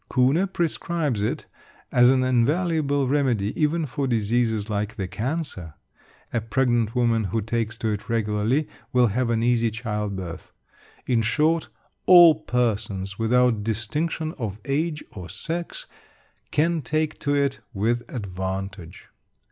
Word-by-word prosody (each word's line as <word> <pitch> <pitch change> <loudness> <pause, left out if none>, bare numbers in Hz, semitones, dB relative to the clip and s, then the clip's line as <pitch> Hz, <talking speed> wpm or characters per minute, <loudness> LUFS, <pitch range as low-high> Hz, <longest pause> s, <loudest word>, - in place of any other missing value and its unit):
Kuhne 135 +9 +3
prescribes 165 - -1
it 105 - -2 0.5
as 125 0 +6
an 130 0 +3
invaluable 145 +2 +1
remedy 125 -7 +1
even 155 +1 +1
for 140 0 -2
diseases 110 -2 +1
like 105 0 -2
the 95 -5 -3
cancer. 110 - -4 0.6
A 115 - +1
pregnant 120 -1 +1
woman 115 -3 +2
who 95 +4 -1
takes 115 +1 -2
to 110 -1 -1
it 105 -1 -4
regularly 115 +5 +1 0.2
will 125 -1 +4
have 120 +3 0
an 115 -1 +1
easy 120 -1 +2
child 105 -3 -3
birth. 90 -3 -7 0.5
In 120 -3 +2
short, 155 +8 +1 0.4
all 175 -3 +9
persons, 110 -9 -2
without 115 -1 +3
distinction 150 +9 -2
of 105 -4 -3
age 150 +2 -1
or 90 -5 -9
sex, 165 - -5 0.6
can 165 +2 +1
take 155 +4 -1
to 145 -1 0
it 140 -1 +1
with 115 +4 0
advantage. 95 -3 -5
120 Hz, 130 wpm, -24 LUFS, 105-145 Hz, 0.6 s, all